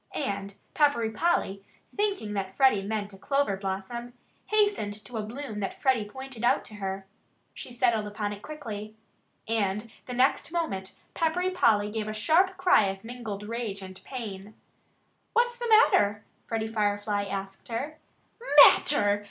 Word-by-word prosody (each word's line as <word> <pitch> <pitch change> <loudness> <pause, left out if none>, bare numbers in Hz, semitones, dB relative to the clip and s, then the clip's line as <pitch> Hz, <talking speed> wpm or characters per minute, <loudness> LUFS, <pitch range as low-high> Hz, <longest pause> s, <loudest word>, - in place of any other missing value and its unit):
And 200 -7 -3 0.2
Peppery 285 -7 +2
Polly 215 - 0 0.3
thinking 400 - -1
that 195 -1 -4
Freddie 260 -7 +5
meant 205 0 -3
a 195 - -13
clover 275 -3 +1
blossom 195 +5 -5 0.3
hastened 410 - +2
to 245 - -7
a - - -1
bloom 220 0 -6
that 195 - -4
Freddie 250 -7 +1
pointed 265 -1 -8
out 240 - +3
to - - -12
her. 195 -1 -4 0.5
She - - -9
settled 235 -3 +1
upon 205 0 -3
it 205 - -10
quickly. 215 -7 -7 0.5
And 215 0 -1 0.2
the 250 - -5
next 260 +5 +2
moment 195 - -3 0.2
Peppery 350 +3 0
Polly 210 - +3
gave 215 -1 -3
a 215 - -3
sharp 350 - +3
cry 365 - +5
of 195 +1 -4
mingled 225 -4 -6
rage 215 -3 -4
and 185 0 -11
pain. 210 -5 -7 0.8
"What's 480 +1 +2
the 480 -1 -3
matter?" 205 - +5 0.2
Freddie 225 -1 -1
Firefly 205 -1 0
asked 195 0 -6
her. 275 +7 -4 0.7
"Matter!" 205 -8 +4
220 Hz, 150 wpm, -28 LUFS, 205-270 Hz, 0.8 s, Freddie